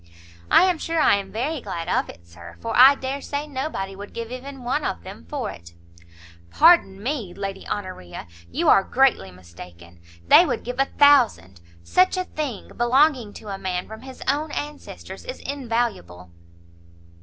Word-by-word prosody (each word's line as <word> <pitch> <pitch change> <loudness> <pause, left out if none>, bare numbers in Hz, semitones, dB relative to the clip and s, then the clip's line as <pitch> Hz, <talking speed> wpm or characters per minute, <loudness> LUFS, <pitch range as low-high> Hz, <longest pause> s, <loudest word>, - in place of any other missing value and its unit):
"I - - +6
am 365 -3 +2
sure 330 +1 -2
I 255 - +4
am 195 -1 -7
very 270 +6 -3
glad 170 -6 -5
of - - 0
it, 85 0 -13
Sir, 85 0 -13
for - - -4
I 265 +3 +8
dare 270 +1 -5
say 285 +1 -4
nobody 260 -9 -4
would 205 +1 -11
give 230 0 -6
even 260 +1 -8
one 270 +5 -1
of 85 - -3
them 80 -1 -11
for - - -3
it." 85 0 -14 0.7
"Pardon 205 - +4
me, 235 -9 -3
Lady 195 -1 -6
Honoria, 185 - -6 0.2
you 85 - -2
are 195 - +6
greatly 255 - +2
mistaken; 85 -1 -14 0.3
they - - +8
would 300 - -2
give 245 +1 -6
a 270 - +4
thousand; 240 - +3 0.2
such 370 - +2
a 370 - 0
thing, 295 - -5
belonging 250 -1 +2
to 215 - -10
a 195 -1 -5
man 180 -1 -3
from 220 0 -10
his 260 0 -10
own 295 +3 0
ancestors, 295 0 -7
is - - -7
invaluable." 225 - -3
235 Hz, 170 wpm, -23 LUFS, 175-280 Hz, 0.7 s, I